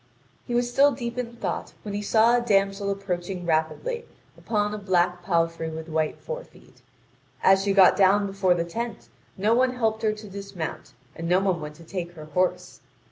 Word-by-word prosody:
He 240 - -2
was 240 0 +2
still 285 +2 +6
deep 235 -1 -5
in 235 -1 -4
thought - - -4
when 205 - -5
he 205 - -2
saw 225 +3 +4
a 245 - +2
damsel 200 -3 +1
approaching 185 -2 -3
rapidly 170 - -1 0.3
upon 210 -2 -1
a 210 - -4
black 180 -2 +1
palfrey 165 -2 0
with 160 0 -7
white 155 -1 -1
forefeet. - - -9 0.6
As 190 0 +5
she 200 -1 +1
got 195 -2 +7
down 200 +1 +4
before 195 -2 +2
the 170 -1 -1
tent 195 - -5 0.3
no 210 +4 +2
one 255 +1 +2
helped 220 -2 0
her 220 -2 +2
to 215 0 -8
dismount, 195 -4 -6 0.2
and 165 +1 -4
no 180 +1 +5
one 190 -4 0
went 150 0 -7
to 165 - -14
take 175 0 -5
her 155 -3 -10
horse. 180 +5 -1
195 Hz, 190 wpm, -25 LUFS, 175-220 Hz, 0.6 s, got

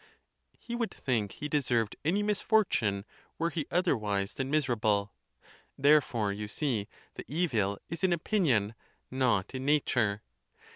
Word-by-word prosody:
He 235 - -8
would 235 -2 -1
think 110 -7 -1
he 150 - -5
deserved 125 -7 0
any 185 +7 +1
misfortune 200 - +1 0.3
were 165 +1 0
he 155 -4 -3
oth 180 +2 +1
erwise 105 - 0
than 135 0 -3
miserable! 110 -9 +1 0.6
Therefore, 135 -7 +3
you 105 +1 -5
see, 110 -4 -1 0.3
the - - -8
evil 115 - 0
is 170 +3 -6
in 190 - +4
opinion, 155 - +1 0.4
not 125 -7 +1
in 130 0 -4
nature. 120 -8 +1
130 Hz, 135 wpm, -30 LUFS, 105-160 Hz, 0.6 s, in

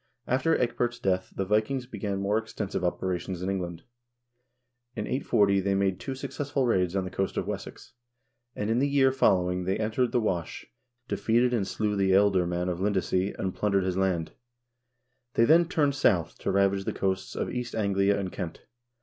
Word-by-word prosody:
After 130 +6 +2
Ecgbert's 120 0 -1
death 95 -5 -1
the 95 - -1
Vikings 110 +6 0
began 100 -4 -4
more 105 +2 +2
extensive 110 -4 -4
operations 90 0 -2
in 95 - -1
England. 85 -3 -4 1.1
In - - -3
840 100 -7 +2
they 100 +1 0
made 95 -2 +1
two 135 - -5
successful 140 +1 -2
raids 95 -6 +1
on 95 - +1
the 90 - -6
coast 95 - -2
of - - 0
Wessex, - - -7 0.6
and 105 +1 -2
in 115 - +2
the 140 +2 +2
year 135 -2 +4
following 90 -8 +2
they 95 +1 0
entered 110 +3 0
the - - +2
Wash, 90 -7 -2 0.4
defeated 120 +2 +2
and 105 -5 0
slew 105 0 -1
the 95 -1 +2
ealdorman 90 -3 +2
of 90 -1 -2
Lindesey 95 -1 0
and 95 -1 -2
plundered 100 -2 +1
his 95 -1 -1
land. 95 -4 0 1.0
They 115 - +5
then 165 +6 +6
turned 155 -6 +1
south 95 - +2
to - - -1
ravage 100 0 +2
the - - -2
coasts 95 -1 -2
of - - -2
East 125 -1 -4
Anglia 100 -1 +2
and 95 -2 -3
Kent. 90 -4 -6
100 Hz, 175 wpm, -27 LUFS, 95-120 Hz, 1.1 s, then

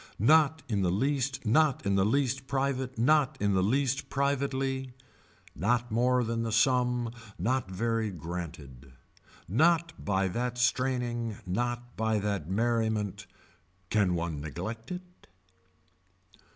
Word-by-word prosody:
Not 155 +6 +4
in 105 -4 0
the 90 - +2
least 135 +6 0
not 140 +4 +3
in 100 - +2
the 95 -1 +3
least 130 +3 0
private 135 -2 -1
not 140 +4 +3
in 100 0 +1
the 95 - +3
least 135 +6 0
privately. 135 -2 -1 0.6
Not 120 +7 0
more 125 +2 +2
than 115 0 -2
the 115 -1 -2
sum 125 0 +2 0.2
not 120 +4 0
very 115 +3 -1
granted. 80 -7 -7 0.5
Not 165 - +3
by 95 -1 +1
that 120 +5 -2
straining 125 -3 0
not 120 +5 -3
by 110 0 +1
that 100 -6 -2
merriment. 110 -1 0 0.6
Can 100 -5 +3
one 85 -3 -3
neglect 95 - -6
it. 180 0 -9
120 Hz, 125 wpm, -29 LUFS, 100-130 Hz, 0.6 s, Not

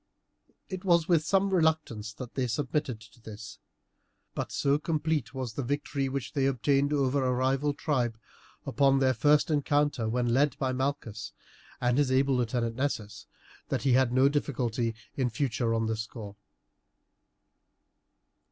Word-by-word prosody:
It 185 -2 -6
was 170 -4 +3
with 165 -4 +3
some 195 +3 +2
reluctance 155 - +1
that 125 +1 -9
they 130 -2 -1
submitted 130 0 -2
to 110 +2 -17
this; 110 -2 -10 0.7
but - - -4
so 140 +1 +1
complete 155 -5 -1
was 130 -4 -4
the 140 - -3
victory 140 +1 -2
which 135 -1 -4
they 135 -3 +2
obtained 135 +2 +1
over 140 -1 +1
a 130 - +1
rival 135 +3 +1
tribe, 125 -8 -1 0.5
upon 135 0 +3
their 130 -1 +3
first 145 +6 +3
encounter 145 -5 +1
when 120 0 0
led 145 +3 +2
by 130 -1 0
Malchus 130 -5 -3 0.5
and 125 +2 +2
his 140 -3 +2
able 135 +1 +3
lieutenant 115 -1 -1
Nessus, 120 -7 -3 0.4
that - - -1
he 135 -3 +3
had 130 -1 +4
no 130 +2 +5
difficulty 125 -5 -1 0.2
in 130 -3 +1
future 120 -1 -1
on 115 0 +1
this 110 0 -1
score. 105 -2 -8
130 Hz, 150 wpm, -29 LUFS, 120-145 Hz, 0.7 s, no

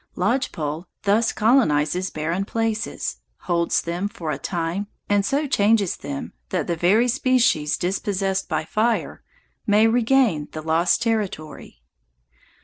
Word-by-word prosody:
Lodge 260 +2 0
pole 155 +3 -4 0.2
thus 210 +3 +2
colonizes 185 - +2
barren 165 +5 -2
places, 225 - -2 0.2
holds 170 -1 0
them 175 +4 -2
for 175 -7 -5
a 140 - -3
time, 175 +6 -3 0.2
and 205 -1 +2
so 280 +9 0
changes 210 -6 +2
them 140 -1 -6 0.2
that 180 -5 -1
the 170 - -1
very 195 +9 +3
species 245 - +2
dispossessed 190 +1 -1
by 155 -1 -1
fire 220 +6 -1 0.5
may 210 +1 +5
regain 230 - +2
the 155 - -5
lost 165 +2 +2
territory. 200 - -3
195 Hz, 130 wpm, -23 LUFS, 165-225 Hz, 0.5 s, may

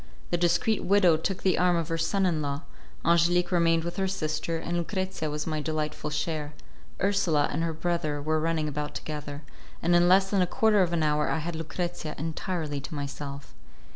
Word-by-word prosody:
The - - +3
discreet 175 +5 +2
widow 185 -4 +5
took 180 +4 -3
the 185 -4 +3
arm 180 0 +4
of 165 -2 -1
her 165 - 0
son 195 +4 +1
in 165 -4 +1
law, 140 +1 -3 0.4
Angelique 175 +2 +3
remained 165 -2 +3
with 170 0 -5
her 190 -1 +1
sister, 165 -2 -2
and 170 +1 -3
Lucrezia 185 -2 -2
was 150 0 -3
my 155 -2 -2
delightful 155 -1 -2
share; 150 0 -3 0.4
Ursula 185 -7 +2
and - - -1
her 165 - 0
brother 160 -2 -1
were 155 +2 0
running 160 -1 0
about 150 0 -4
together, 145 +1 -6 0.4
and 175 +1 +3
in 175 0 +5
less 190 +1 +5
than 200 -2 +3
a 180 - +3
quarter 215 +1 +3
of 175 -2 +2
an 170 -2 +1
hour 150 0 +2
I - - +1
had 165 +2 -3
Lucrezia 165 0 -4
entirely 160 -1 -3
to 140 +3 -7
myself. 140 0 -6
165 Hz, 195 wpm, -27 LUFS, 150-175 Hz, 0.4 s, widow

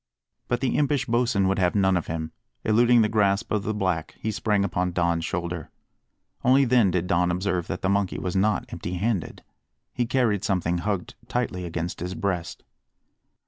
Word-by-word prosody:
But 120 - -1
the 130 - +1
impish 145 -2 +1
Bosin 115 -4 +2
would 95 0 +1
have 90 +1 +2
none 95 -2 +3
of 90 - -1
him; 80 -1 -4 0.3
eluding 120 +2 +5
the - - +3
grasp 105 -1 +1
of 105 - +1
the 105 - -2
black, 90 -6 -1
he 110 - -2
sprang 105 -1 +1
upon 90 -1 -1
Don's 85 -2 +1
shoulder. 85 -2 -3 0.7
Only 135 +2 +5
then 120 -5 +4
did 90 -1 0
Don 90 0 +2
observe 90 -1 -1
that 95 - -5
the - - +2
monkey 100 -1 +1
was 90 -1 -3
not 105 +1 +2
empty 90 - -4
handed. 100 -1 -2 0.5
He 120 -2 -1
carried 115 -6 +1
something 90 -4 0
hugged 95 0 -2
tightly 100 -7 -2
against 85 +1 -4
his 90 +2 -4
breast. 90 -4 -3
95 Hz, 180 wpm, -25 LUFS, 90-110 Hz, 0.7 s, eluding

